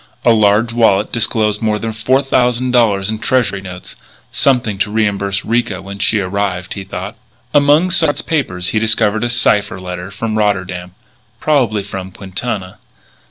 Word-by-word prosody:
A 120 - +6
large 110 +2 +3
wallet 110 -4 +2
disclosed 110 -2 +1
more 110 -1 +1
than 110 +1 -4
four 130 +6 +1
thousand 125 -1 +1
dollars 105 -5 +2
in 110 - -4
Treasury 120 -7 0
notes 90 -2 -9 0.4
something 120 -7 +1
to 100 - 0
reimburse 100 -2 -1
Ricca 115 -4 0
when 100 +1 -9
she 110 - +2
arrived, 95 -1 -2
he 100 - -6
thought. 95 +3 -6 0.4
Among 145 +5 +4
Sard's 160 -5 +2
papers 90 - -1
he 110 - +1
discovered 110 0 +1
a 120 - 0
cipher 105 -5 +2
letter 90 0 -6
from 110 +1 -3
Rotterdam 95 -3 -1 0.4
probably 120 -9 +1
from 95 -1 -6
Quintana. 95 +1 -5
105 Hz, 155 wpm, -16 LUFS, 95-120 Hz, 0.4 s, A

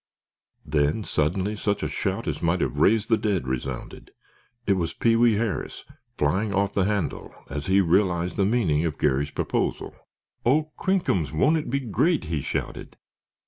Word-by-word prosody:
Then, 75 +7 +1
suddenly, 95 +6 0
such 105 -1 -1
a - - 0
shout - - -3
as - - -3
might 85 +2 +1
have - - -1
raised 110 0 +3
the 115 - +2
dead 100 -10 -1
resounded. 65 0 -5 0.6
It 100 - +3
was 85 -4 -1
Pee 115 -1 +2
wee 115 0 +4
Harris, 105 -5 -3 0.3
flying 100 +8 0
off 100 +1 +1
the 95 - +2
handle, 105 -2 -2 0.2
as 75 0 -4
he 95 +1 +4
realized 90 -1 +1
the 100 - +1
meaning 95 -9 +1
of 80 -3 -2
Garry's 70 +3 +1
proposal. - - -2 0.5
"Oh, 150 +5 +2
crinkums, 175 - 0
won't 145 - +3
it 155 - -4
be 140 +3 0
great!" 150 - +1
he 80 -3 -2
shouted. - - -5
95 Hz, 165 wpm, -25 LUFS, 80-110 Hz, 0.6 s, wee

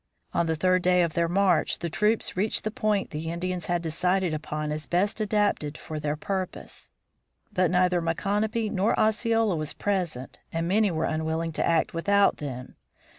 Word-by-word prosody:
On 170 - +1
the 160 - +1
third 185 +3 +2
day 180 0 +4
of 165 -2 -1
their 170 +1 +1
march 185 -2 +2
the 170 - -3
troops 210 +7 +1
reached 205 +4 +1
the 215 - -2
point 210 -2 0
the 160 +1 -4
Indians 175 0 -3
had 175 -1 0
decided 180 +2 0
upon 150 0 -3
as 150 0 -4
best 200 +5 0
adapted 205 -8 0
to 155 0 -6
their 150 0 -1
purpose. 190 +4 -5 0.6
But 185 -3 +2
neither 180 0 +2
Micanopy 210 +7 -1
nor 200 +3 +1
Osceola 220 -1 +2
was 155 -2 -3
present 175 -10 -2
and 165 +1 -2
many 205 +3 +3
were 160 -2 -1
unwilling 160 +1 -1
to - - -1
act 165 -1 +1
without 200 +4 +3
them. 130 -3 -7
180 Hz, 175 wpm, -26 LUFS, 160-200 Hz, 0.6 s, day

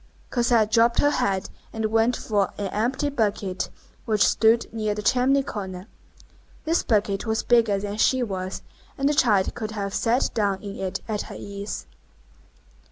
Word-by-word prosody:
Cosette 235 -3 +2
dropped 235 +1 +4
her 290 - +4
head, 195 -8 -1 0.2
and 220 -1 -3
went 225 +2 +2
for 205 -3 0
an 200 -2 -3
empty 245 +8 -1
bucket 205 -8 -1 0.4
which 215 -4 +3
stood 230 +1 +3
near 215 -2 -1
the 210 - -5
chimney 265 +4 +3
corner. 190 -6 -6 0.8
This 330 +2 +2
bucket 205 -1 0
was 220 0 0
bigger 230 -4 +3
than 205 +1 -4
she 255 +3 +3
was, 190 -4 -4 0.3
and 275 -1 +1
the 295 - +3
child 210 -9 +3
could 220 -3 -5
have 200 -1 -3
set 240 +3 +1
down 200 -3 0
in 200 -1 -6
it 190 -1 -3
at 215 -2 -2
her - - -8
ease. 200 0 -6
215 Hz, 165 wpm, -24 LUFS, 200-240 Hz, 0.8 s, dropped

